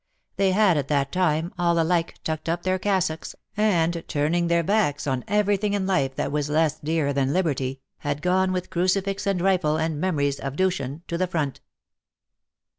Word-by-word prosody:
They 195 -1 +2
had, 195 -5 +4
at 140 -2 -1
that 140 -2 0
time, 170 -1 0
all 170 -1 +2
alike 165 0 +1
tucked 155 0 -3
up 170 +1 -1
their 185 0 0
cassocks, 185 -5 -1 0.2
and, 170 -6 +1
turning 160 +4 +1
their 170 0 +2
backs 155 -7 +1
on 130 -3 -1
everything 205 0 +1
in 200 -2 0
life 140 -9 0
that - - -2
was 150 0 -1
less 155 0 +1
dear 150 -2 0
than 135 0 +1
liberty, 135 -7 -1 0.2
had 145 0 -3
gone 185 +1 +2
with 180 -1 -3
crucifix 195 +3 0
and 195 -2 +1
rifle 180 -4 +2
and 160 -1 -1
memories 145 -7 0
of 135 0 -4
Dushan 165 -5 -1
to 170 - -3
the 185 - +1
front. 155 -6 -2
170 Hz, 180 wpm, -24 LUFS, 150-185 Hz, 0.2 s, had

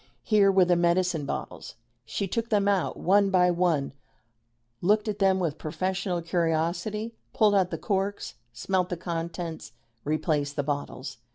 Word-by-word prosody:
Here 205 -3 +4
were 190 -1 +5
the 175 0 +3
medicine 170 -3 +1
bottles. - - -6 0.3
She 195 - -3
took 230 +5 -2
them 205 -2 +2
out 195 -4 +1
one 200 +2 +3
by 180 -2 +4
one, 170 -6 0 0.9
looked 210 +4 +2
at 210 -1 -3
them 190 -1 +4
with 160 -4 -2
professional 180 +2 -2
curiosity, 170 +6 -1 0.2
pulled 215 -2 +4
out 190 -3 +3
the - - -4
corks, 200 0 -2 0.2
smelt 180 +9 -1
the 180 - -3
contents, 170 -1 -5 0.3
replaced 150 -1 -1
the 145 - -1
bottles. 140 -3 -4
180 Hz, 150 wpm, -27 LUFS, 165-195 Hz, 0.9 s, were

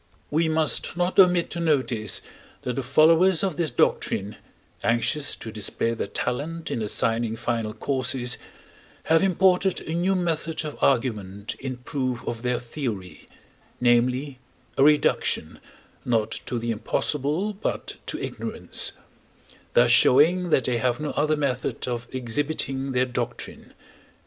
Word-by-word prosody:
We 160 +2 +2
must 160 +2 +1
not 180 +2 +1
omit 180 -2 +5
to 170 - -4
notice 130 - +1 0.4
that 125 - -2
the 135 - -1
followers 165 +6 +4
of 190 -5 0
this 165 0 0
doctrine, 105 -3 0 0.5
anxious 120 +6 +1
to 110 - -8
display 110 +2 -1
their 115 - -3
talent 155 +7 -3
in 115 - -2
assigning 115 +1 0
final 115 -2 -2
causes, 125 +1 -1 0.6
have 160 0 +3
imported 190 0 +3
a 160 - -5
new 180 +3 +1
method 165 -3 -1
of 150 - -5
argument 105 -6 0
in 130 -2 -5
proof 130 -1 -3
of 115 -1 -3
their 125 0 0
theory 115 -7 -6 0.5
namely, 125 +3 +2 0.4
a 135 - +4
reduction, 150 0 +2 0.4
not 115 -3 +1 0.2
to 120 - -2
the 115 0 -2
impossible, 150 - -1
but 200 - -4
to - - -3
ignorance; - - -3 0.8
thus 120 0 +5
showing 160 +9 +5
that 135 - +3
they 120 -1 0
have 120 +2 0
no 150 -1 -2
other 155 +1 +1
method 135 -4 -2
of 120 -1 -3
exhibiting 135 +1 -1
their 125 0 +2
doctrine. 125 -1 -5
130 Hz, 135 wpm, -25 LUFS, 120-160 Hz, 0.8 s, omit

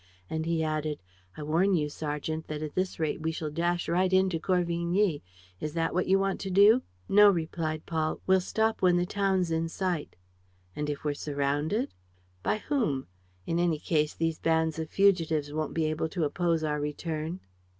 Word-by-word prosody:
And 160 0 -2
he 165 -1 +1
added, 155 -1 -1 0.4
"I 150 - -5
warn 175 +6 +2
you, 150 -3 +1
sergeant, 150 +1 -4
that 155 0 -4
at 150 - -5
this 185 -1 -2
rate 155 -1 -1
we 160 +1 0
shall 155 -1 -4
dash 170 +2 0
right 185 +2 +2
into 185 -3 +3
Corvigny. 175 0 +1 0.4
Is 150 - -4
that 165 -1 0
what 180 +1 0
you 190 - +5
want 195 0 0
to 195 - -4
do?" 205 +6 +6 0.3
"No," 205 +1 +7
replied 160 -3 -2
Paul, 160 -1 -1
"we'll 190 0 +4
stop 220 +4 0
when 180 -2 +4
the 175 - +1
town's 190 -3 0
in 165 0 0
sight." 175 -3 -2 0.6
"And, 150 0 -2
if 145 - -4
we're 145 - +1
surrounded?" 145 - -1 0.5
"By - - 0
whom? 215 - -1 0.4
In 165 - 0
any 170 -3 +2
case, 150 0 0
these 165 -1 -1
bands 160 -1 +1
of 160 -1 -4
fugitives 165 -7 +2
won't 155 -1 -3
be 160 -1 +1
able 155 +1 -1
to 170 0 -2
oppose 165 +1 0
our 150 -1 0
return." 155 +3 -3
165 Hz, 180 wpm, -29 LUFS, 155-185 Hz, 0.6 s, No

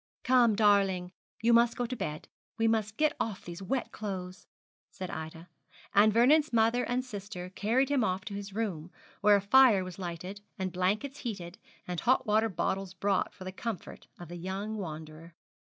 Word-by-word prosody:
'Come, 245 -4 +4
darling, 195 -4 +3 0.3
you 235 +1 +5
must 235 0 +4
go 245 - 0
to 255 +2 -4
bed; 150 -9 -5 0.3
we 225 0 +2
must 215 -2 0
get 305 0 +2
off 210 -4 -3
these 170 +1 -7
wet 245 +7 -2
clothes,' 190 -3 -6 0.4
said 185 -1 -7
Ida, 160 +2 -7 0.5
and 210 +2 +6
Vernon's 280 +7 +4
mother 230 +1 +3
and 250 +1 -1
sister 200 -5 -7
carried 235 +8 +1
him 280 -4 +2
off 185 -1 -1
to 205 - -6
his 200 0 -6
room, 190 -6 -3 0.3
where 210 -1 +6
a 200 - +2
fire 220 -1 +6
was 185 0 -8
lighted, 180 +3 -6 0.2
and 185 -1 -3
blankets 210 +10 -1
heated, 190 -7 -6 0.3
and 180 -2 -3
hot 260 +2 +2
water 220 +1 +2
bottles 190 +1 -2
brought 195 0 0
for 185 - -12
the 185 - -5
comfort 220 +1 -6
of 175 - -9
the 175 - -7
young 195 +5 -4
wanderer. 160 -3 -8
200 Hz, 180 wpm, -30 LUFS, 180-230 Hz, 0.5 s, and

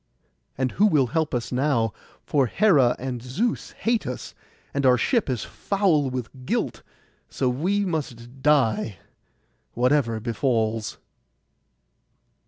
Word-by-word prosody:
And 130 -1 0
who 210 - +4
will 150 -9 +3
help 160 -2 +1
us 120 - -3
now? 125 -5 +1 0.3
For 140 -4 +2
Hera 140 - +4
and 125 -2 -4
Zeus 165 - -2
hate 230 -1 0
us, 125 - -6 0.4
and 140 - -1
our 125 -1 +5
ship 235 - +1
is 125 -4 -1
foul 180 -9 +1
with 125 -2 -3 0.2
guilt; - - -2 0.5
so 130 - -1
we 180 +11 +1
must 130 -7 -5
die, 130 -9 +2 0.8
whatever 125 -2 +2
befalls. 115 -2 -1
130 Hz, 120 wpm, -24 LUFS, 120-155 Hz, 0.8 s, our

